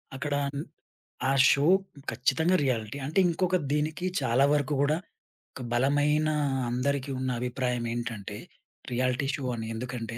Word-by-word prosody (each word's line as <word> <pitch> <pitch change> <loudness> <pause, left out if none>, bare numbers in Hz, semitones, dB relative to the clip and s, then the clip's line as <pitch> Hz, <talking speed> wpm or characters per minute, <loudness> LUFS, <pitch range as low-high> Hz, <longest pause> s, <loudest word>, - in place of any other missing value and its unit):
అక్కడా 145 +1 -1 0.2
న్ 145 - -2 0.6
ఆ - - +2 0.2
షో 140 +1 +3 0.5
ఖచ్చితంగా 160 +9 +2
రియాలిటీ. 115 -3 -1
అంటే, 155 +7 +1
ఇంకొక 180 +2 +1 0.2
దీనికి 155 +4 -1 0.2
చాలా 130 +1 +3
వరకు 145 0 +1
గూడా 150 +2 +2 0.6
ఒక 130 - -7
బలమైనా 145 +4 +2 0.4
అందరికీ 135 +3 -1
ఉన్న 130 0 -1
అభిప్రాయమేంటంటే, 120 -3 -3 0.5
రియాలిటీ 125 +2 0
షో 140 - -6
అని. 110 -1 -5
ఎందుకంటే, 115 -1 -5
135 Hz, 125 wpm, -28 LUFS, 120-145 Hz, 0.6 s, షో